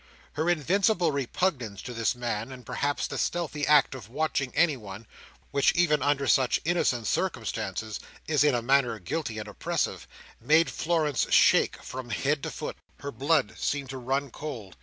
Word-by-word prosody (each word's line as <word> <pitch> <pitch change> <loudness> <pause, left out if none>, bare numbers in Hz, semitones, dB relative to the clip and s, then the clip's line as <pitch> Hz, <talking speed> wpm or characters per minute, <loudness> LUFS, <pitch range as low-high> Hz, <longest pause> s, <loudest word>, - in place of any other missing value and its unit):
Her 160 +4 0
invincible 175 - +2
repugnance 135 - -1
to 125 - -6
this 115 +1 0
man, 120 -1 -3
and 125 -2 -10
perhaps 140 +4 -1
the - - -4
stealthy 155 -4 -1
act 150 -2 +5
of 120 -6 -9
watching 140 -1 -1
anyone, 115 - 0 0.5
which, 140 - +3
even 155 -4 +3
under 140 -1 +1
such 130 -1 +3
innocent 150 -9 +1
circumstances, 110 +2 -2 0.3
is 150 -2 +3
in 145 -4 +4
a 120 - -1
manner 130 -2 +3
guilty 110 - -4
and 105 - -5
oppressive, - - -2 0.3
made 160 +3 +3
Florence 155 -5 0
shake - - +4
from 130 -1 -7
head 140 +6 0
to - - -3
foot. - - -6 0.2
Her 140 - -4
blood 140 0 +1
seemed 140 -2 -2
to 135 - -6
run 135 +2 -1
cold. 115 -12 -7
140 Hz, 160 wpm, -27 LUFS, 120-155 Hz, 0.5 s, act